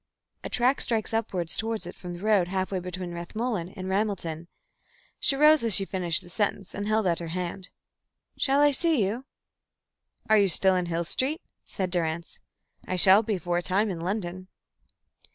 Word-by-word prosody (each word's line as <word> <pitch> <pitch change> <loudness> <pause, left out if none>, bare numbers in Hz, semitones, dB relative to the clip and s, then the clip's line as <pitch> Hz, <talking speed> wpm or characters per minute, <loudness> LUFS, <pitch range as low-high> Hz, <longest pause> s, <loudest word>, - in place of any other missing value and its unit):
A - - -5
track 250 +3 +2
strikes 225 -2 0
up 225 0 0
towards 195 +4 -2
it 175 - -7
from 180 -1 -8
the 175 - -10
road 210 -5 +3
halfway 190 0 -2
between 180 0 -6
Rathmullen 185 +1 -3
and 185 0 -5
Ramelton." 190 -5 -2 0.7
She 275 - +5
rose 300 0 +5
as 225 -4 +3
she 195 - +2
finished 180 -4 0
the 175 - -14
sentence 200 0 -2
and 205 +1 -4
held 215 -1 +1
out 170 -2 +1
her 170 - -5
hand. 180 +2 -5 0.7
"Shall 275 +1 +2
I 290 0 +5
see 295 - +2
you?" 230 +7 -4 1.0
"You 215 -2 +5
are - - +1
still 190 +1 +3
in 180 -1 -1
Hill 170 0 -1
Street?" 270 - 0 0.2
said 185 -2 -4
Durrance. 170 -1 -2 0.5
"I 185 - -2
shall 190 +3 +7
be 215 -3 -2
for 175 0 -1
a - - -3
time 195 +4 0
in 175 - -5
London." 185 0 -4
190 Hz, 180 wpm, -26 LUFS, 175-220 Hz, 1.0 s, shall